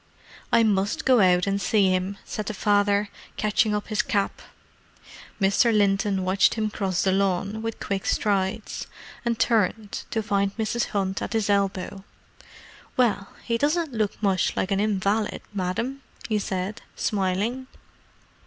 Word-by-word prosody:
"I 230 - +5
must 200 -2 +1
go 255 -2 +5
out 180 -2 +4
and 200 0 0
see 195 0 +3
him," 185 +2 -1
said 215 - -5
the 215 - -3
father, 205 0 +2 0.3
catching 210 0 +2
up 210 - -4
his 215 -1 +2
cap. 200 -1 -1 1.0
Mr. 200 +4 +4
Linton 200 -2 +2
watched 190 +2 +3
him 215 -2 -1
cross 190 -3 -1
the 190 - +2
lawn 195 +2 0
with 225 0 -4
quick 195 -1 -3
strides: 200 0 -1 0.4
and 235 -1 0
turned, 220 -2 0
to 220 - -1
find 200 -1 0
Mrs. 230 +2 0
Hunt 195 -2 -2
at - - -4
his 220 -2 +1
elbow. 195 -1 -1 0.9
"Well—he 230 0 0
doesn't 300 +1 +1
look 215 -1 -2
much 190 -3 +1
like 190 - -1
an 195 - +2
invalid, 205 +1 0
Madam!" 205 +8 -2 0.3
he 215 -2 +1
said, 195 +3 -3
smiling. 210 +5 -1
205 Hz, 145 wpm, -25 LUFS, 195-220 Hz, 1.0 s, I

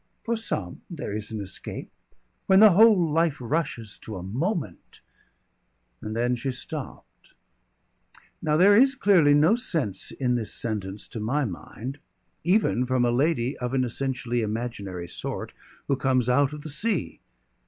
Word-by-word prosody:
"For 235 -1 0
some 105 - -3
there 160 - -5
is 105 0 -4
an 110 -2 -4
escape. 95 - -6 0.6
When 190 0 +6
the 215 -1 +9
whole 190 -4 +5
life 165 -1 +2
rushes 120 - -3
to 110 -3 -7
a 90 - -7
moment 155 - -4 0.5
" - - -45
And 110 0 -5
then 120 +2 +1
she 130 +3 -2
stopped. 145 +2 -8 1.1
Now 155 -1 +1
there 200 +4 +6
is 265 +4 +5
clearly 180 - +5
no 155 +7 +5
sense 160 - -2
in 125 -2 -1
this 115 -3 -2
sentence 105 -3 -4
to 115 - -6
my 135 +7 0
mind, 120 +7 -7 0.4
even 170 - +2
from 130 -1 +2
a 120 - +2
lady 135 0 +1
of 125 +1 -2
an 130 - +2
essentially 125 -1 -2
imaginary 105 -5 -4
sort, 85 - -5 0.3
who 140 - +2
comes 130 -2 +1
out 135 +2 +3
of 150 -1 -8
the 155 - -5
sea. 215 +10 -1
130 Hz, 155 wpm, -26 LUFS, 115-165 Hz, 1.1 s, the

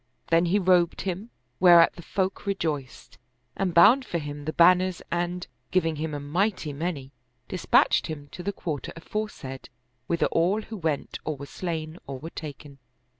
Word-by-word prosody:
Then 165 +1 +5
he 185 +4 +3
robed 180 -3 +3
him, 195 +4 -4 0.3
whereat 175 -2 +7
the - - -11
folk 190 +3 -2
re 200 - +1
joiced, 145 -8 -5 0.4
and 195 -2 0
bound 220 +11 +7
for 175 - -3
him 145 -2 -6
the 155 - -1
banners 180 +1 +4
and, 175 +1 -2 0.2
giving 165 -4 +1
him 155 0 -3
a - - -3
mighty 165 +2 -1
many, 145 -3 -4 0.4
dispatched 185 - +3
him 150 -3 -6
to - - -8
the 200 - -2
quarter 155 -7 -5
aforesaid, 165 - -6 0.4
whither 170 - +1
all 185 +6 +2
who 220 - -8
went 160 -5 -2
or 155 -2 -3
were 140 - -7
slain 160 +1 -5
or 135 -1 -5
were 160 +5 -8
taken. 145 -2 -9
170 Hz, 170 wpm, -26 LUFS, 150-185 Hz, 0.4 s, whereat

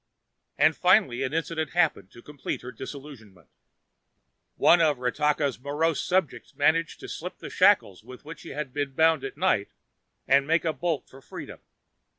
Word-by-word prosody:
And 155 0 +4
finally 180 - +3
an 130 -1 -1
incident 160 0 -3
happened 165 - +1
to 120 - -16
complete 145 -2 -6
her 125 - -7
disillusionment. 115 - -11 1.1
One 170 0 +5
of 150 -4 +3
Ratakka's 140 0 0
morose 150 +4 -1
subjects 185 -4 -1
managed 160 +2 +1
to - - -8
slip - - -7
the - - -9
shackles 95 +1 +3
with 125 +4 -13
which 160 0 -10
he - - -10
was 145 0 -3
bound 160 -2 +3
at 135 - -6
night 180 - +1 0.6
and 140 +1 +4
make 165 +2 +2
a 160 - 0
bolt 165 -6 -2
for 135 - -15
freedom. - - -10
145 Hz, 160 wpm, -26 LUFS, 130-165 Hz, 1.1 s, One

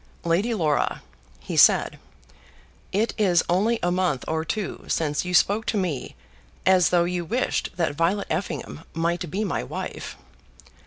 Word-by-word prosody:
"Lady 175 +8 +1
Laura," 155 -7 0 0.4
he - - -5
said, - - +5 0.9
"it 215 +4 0
is 180 -5 +4
only 210 +7 +2
a 175 - +2
month 180 -8 0
or 160 0 -1
two 200 +5 -4
since 150 0 0
you 180 - -3
spoke 205 +5 +3
to 215 - 0
me 175 -9 -3 0.5
as 185 -2 +5
though 175 -1 +3
you 175 0 -2
wished 235 +10 -1
that 170 -4 0
Violet 170 +7 0
Effingham 175 -4 -4
might 170 +1 -1
be 195 +7 -2
my 185 - -2
wife." 60 - -6
175 Hz, 150 wpm, -24 LUFS, 165-200 Hz, 0.9 s, said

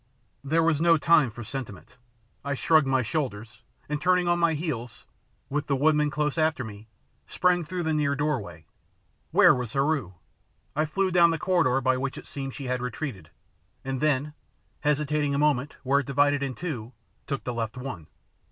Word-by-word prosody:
There 160 +4 +2
was 160 -2 +2
no 165 -1 +5
time 155 -4 +4
for 120 +2 -9
sentiment. 120 -6 -7 0.5
I 140 0 -2
shrugged 155 +1 +3
my 130 -1 +2
shoulders, 120 -4 -4 0.3
and 150 0 -3
turning 180 +1 +3
on 175 0 +2
my 170 -2 +2
heels, 135 -7 -5 0.4
with 145 +1 -2
the 140 - +1
woodmen 150 +1 +3
close 150 +1 -1
after 155 -4 +1
me, 110 -1 -10 0.4
sprang 180 -1 +2
through 175 +3 -4
the 160 -1 0
near 145 -2 +1
doorway. 105 - -3 0.6
Where - - +6
was 125 -3 -4
Heru? 140 - 0 0.6
I 155 +1 +2
flew 190 +4 0
down 170 -1 +6
the 165 - 0
corridor 160 -7 +2
by 130 0 +2
which 130 0 -3
it - - -9
seemed 135 -2 -6
she 140 - -6
had 125 -1 -2
retreated, 125 - -5 0.6
and 135 -1 -3
then, 150 0 +1 0.5
hesitating 150 -1 0
a - - 0
moment 145 -2 +1
where 135 +2 +3
it 140 - -5
divided 145 +1 +2
in 135 -2 -3
two, 130 -7 -5 0.3
took 140 - -3
the 125 - -3
left 115 0 -4
one. 125 - -7
140 Hz, 180 wpm, -26 LUFS, 125-155 Hz, 0.6 s, Where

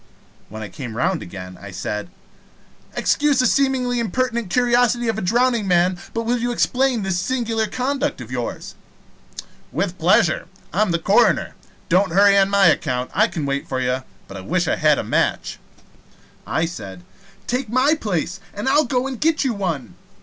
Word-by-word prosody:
When 110 +1 -7
I - - -5
came 120 -1 -8
round 175 +4 0
again, 90 0 -9
I 100 - -9
said: 105 - -4 0.9
"Excuse 295 -2 +2
the 255 - +3
seemingly 255 -2 +1
impertinent 235 -1 -1
curiosity 240 +1 +2
of 220 - -1
a - - -4
drowning 235 +2 +1
man, 180 0 +2 0.2
but 230 - -1
will 240 +2 0
you 240 +1 -1
explain 250 -1 +1
this 190 -2 -1
singular 225 +1 -1
conduct 275 - -2
of 125 -1 -9
yours?" 125 -2 -4 1.0
"With - - -2
pleasure. - - +3 0.3
I 195 - +1
am 215 - +2
the 170 - +1
coroner. 200 +3 +2 0.3
Don't 185 0 +2
hurry 200 +1 +6
on 195 0 +4
my 200 -1 +4
account. 130 -6 +1
I 215 +2 +4
can 160 -9 -4
wait 140 0 -2
for 130 - -1
you. 130 +1 0 0.3
But 100 - -9
I - - -7
wish 95 - -1
I - - +2
had - - +4
a - - -2
match." - - -1 0.9
I 160 - 0
said: 95 - -8 0.4
"Take 250 -1 -2
my 255 +6 +3
place, 195 - -2 0.2
and 205 +5 -4
I'll 290 +3 +4
go 255 -2 0
and 265 -3 -5
get 320 -1 +2
you 260 -3 0
one." 165 - -3
205 Hz, 180 wpm, -21 LUFS, 160-245 Hz, 1.0 s, hurry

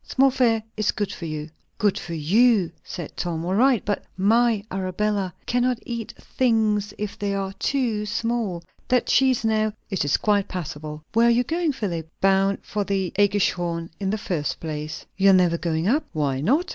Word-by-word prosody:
"Small 270 0 +3
fare 230 -4 +2
is 215 -1 +1
good 205 -2 -3
for 170 - -7
you!" 155 -1 -4 0.3
"Good 205 -2 +1
for 170 - -6
you," 195 +4 +3
said 175 -5 -7
Tom, 165 -1 -3
"all 180 - -1
right; 245 +2 +3
but 205 -2 -1
my 225 +2 +3
Arabella 190 +1 -1
cannot 245 0 +1
eat 235 -2 -5
things 215 -4 +1
if 210 -1 -5
they 200 -1 -1
are 195 -1 -3
too 230 -6 0
small. 220 -6 -2 0.2
That 250 -1 +2
cheese, 260 -3 +3
now! 215 -1 +1
" - - -44
"It 190 - 0
is 145 -1 +2
quite 205 -2 +1
passable." 155 -3 -6
"Where 230 +1 +5
are - - +6
you 235 +1 +3
going, 325 +2 0
Philip?" 170 - -4
"Bound 195 0 +3
for 205 0 -2
the 195 -3 -1
AEggischhorn, 175 -4 +1
in 195 -2 -1
the 215 - 0
first 170 -8 -3
place." 155 -1 -5
"You 195 0 +5
are - - +7
never 175 -2 +3
going 165 0 -1
up?" 290 +8 +2
"Why 140 -4 0
not?" 290 - +2
205 Hz, 185 wpm, -24 LUFS, 175-230 Hz, 0.3 s, are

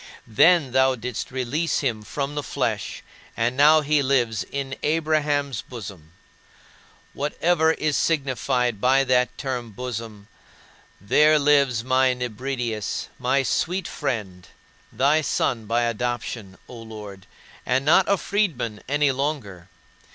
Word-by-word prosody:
Then 140 - +4
thou 130 0 +3
didst 125 -1 -5
release 130 +6 -1
him 120 -6 -1
from 140 +6 -4
the 145 - -2
flesh, - - -3 0.3
and 120 +2 0
now 150 +3 +6
he 150 0 +2
lives 120 -6 +1
in 135 +2 -5
Abraham's 150 -4 0
bosom. 95 -9 -10 1.0
Whatever 160 +3 +1
is 155 -2 -1
signified 130 -6 0
by 135 +2 +4
that 125 -1 +1
term 125 -4 -4
"bosom," 110 -2 -7 0.7
there 150 - +4
lives 140 -5 +3
my 130 0 +2
Nebridius, 120 -3 -3
my 135 +2 +1
sweet 180 +7 -1
friend, 95 -8 -4 0.4
thy 145 +4 +2
son 115 -6 -1
by 120 +2 +1
adoption, 120 -4 -3
O 125 - -10
Lord, 105 -4 -10 0.4
and 130 +2 0
not 175 +5 +4
a 200 - +3
freedman 150 - -1
any 145 0 +2
longer. 130 - -4
130 Hz, 120 wpm, -23 LUFS, 115-145 Hz, 1.0 s, now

